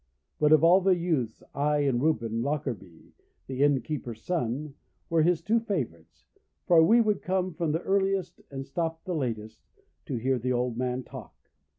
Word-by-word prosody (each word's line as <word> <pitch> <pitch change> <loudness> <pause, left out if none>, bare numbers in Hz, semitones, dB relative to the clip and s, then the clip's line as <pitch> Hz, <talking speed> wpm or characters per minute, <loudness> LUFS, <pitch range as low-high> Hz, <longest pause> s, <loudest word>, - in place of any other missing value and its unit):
But 150 0 +3
of 155 0 +6
all 175 +3 +6
the 190 0 +4
youths 155 -10 -2
I 150 +1 +1
and 135 -4 +1
Reuben 115 -7 0
Lockarby, 130 - -4 0.3
the 130 0 -4
innkeeper's 140 -5 0
son, 145 -3 -2 0.4
were 165 -1 +4
his 170 +1 +2
two 225 +5 +2
favourites, 135 - -5 0.4
for 170 -2 +6
we 225 +8 +5
would 215 -3 +2
come 185 -2 -1
the 165 0 0
earliest 195 -1 0
and 135 -1 -6
stop 165 0 -3
the 185 - -4
latest 110 -7 -3 0.5
to 140 - -3
hear 130 +2 0
the 125 +2 -1
old 125 -1 -1
man 125 +1 -2
talk. - - -11
150 Hz, 165 wpm, -28 LUFS, 125-175 Hz, 0.5 s, of